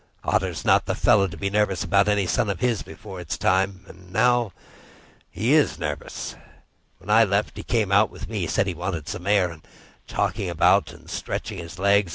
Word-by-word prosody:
Otter's - - -1
not - - +4
the - - 0
fellow 100 -2 +4
to 90 - -9
be 100 0 -2
nervous 100 -3 +1
about 100 +1 +3
any 105 -2 +2
son 110 +3 0
of 95 -4 -2
his 120 -2 +1
before 100 -4 -9
it's 85 - -4
time. 95 0 +1
And 90 0 -15
now 120 +1 +2 0.8
he 115 - 0
is 155 -2 +3
nervous. 75 -3 -5 0.6
When 105 - -6
I 115 +2 +7
left, 100 0 0
he - - -6
came 110 -5 0
out 100 +2 +5
with - - -9
me—said 100 -3 0
he 95 - -2
wanted 85 -3 -4
some 90 +3 -6
air, 100 -4 +3
and 80 -1 -12 0.5
talked - - -1
about - - +2
stretching - - -5
his 85 +1 -9
legs. 100 0 +3
100 Hz, 190 wpm, -24 LUFS, 90-105 Hz, 0.8 s, I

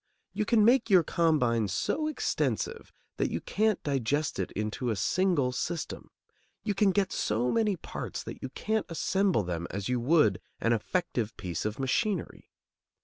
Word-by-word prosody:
You 215 - -1
can 215 -1 +4
make 245 +1 +4
your 185 -4 +6
combine 145 - +2
so 305 - -1
extensive 455 +8 -2 0.3
that - - +1
you - - -2
can't 215 -2 0
digest 140 -1 0
it 95 - -1
into 110 +4 -2
a 110 - +1
single 150 - +1
system; 165 +6 -4 0.5
you 205 - 0
can 205 0 +3
get 195 0 +1
so 115 +4 0
many 215 -3 +2
parts - - -6
that - - -8
you 130 - -4
can't 220 +10 -2
assemble 185 - +1
them 85 -1 -3
as 100 +2 -4
you 125 -1 +1
would 125 - +3 0.2
an 115 - +2
effective 115 - -1
piece 90 -3 -4
of 105 0 -2
machinery. 170 - -1
150 Hz, 160 wpm, -29 LUFS, -, 0.5 s, your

